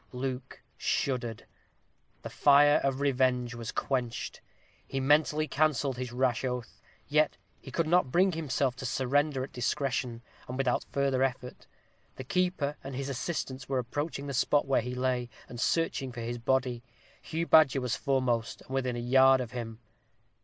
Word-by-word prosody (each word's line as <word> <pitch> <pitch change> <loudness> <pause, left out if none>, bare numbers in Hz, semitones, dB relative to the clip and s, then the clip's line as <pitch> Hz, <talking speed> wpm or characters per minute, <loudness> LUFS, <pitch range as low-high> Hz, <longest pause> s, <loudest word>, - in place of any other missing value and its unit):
Luke 130 0 -5 0.2
shuddered. 120 -5 -1 0.8
The - - -6
fire 145 +1 +5
of 135 0 0
revenge 130 -3 +1
was 115 -2 -5
quenched. 120 -4 -2 0.5
He 135 - -3
mentally 150 +2 +3
cancelled 145 -3 +1
his 125 -1 -4
rash 125 -1 0
oath; 125 -2 -4 0.3
yet 150 0 +2 0.2
he - - -11
could 165 +5 0
not 175 -3 +3
bring 185 +4 +4
himself 140 -5 -1
to 130 - -6
surrender 135 +2 +1
at 135 - -8
discretion, 125 -1 -2 0.2
and 125 - -5
without 135 -2 0
further 135 -2 +1
effort. 130 -1 -3 0.5
The - - -7
keeper 155 -1 0
and 135 0 -6
his 140 +1 -3
assistants 135 -1 -4
were 135 - 0
approaching 140 +4 -3
the 140 - -4
spot 145 +3 +2
where 135 -3 +2
he 125 +2 -5
lay, 125 -1 -1 0.2
and 120 - -9
searching 135 -2 0
for 120 -1 -7
his 120 +1 -4
body. 130 0 0 0.4
Hugh 165 +1 -3
Badger 155 -5 +6
was 125 -2 -1
foremost, 130 -5 0
and - - -19
within 130 -2 -1
a - - -3
yard 130 +2 +5
of 120 -3 -4
him. 115 -3 -6
130 Hz, 160 wpm, -29 LUFS, 125-145 Hz, 0.8 s, Badger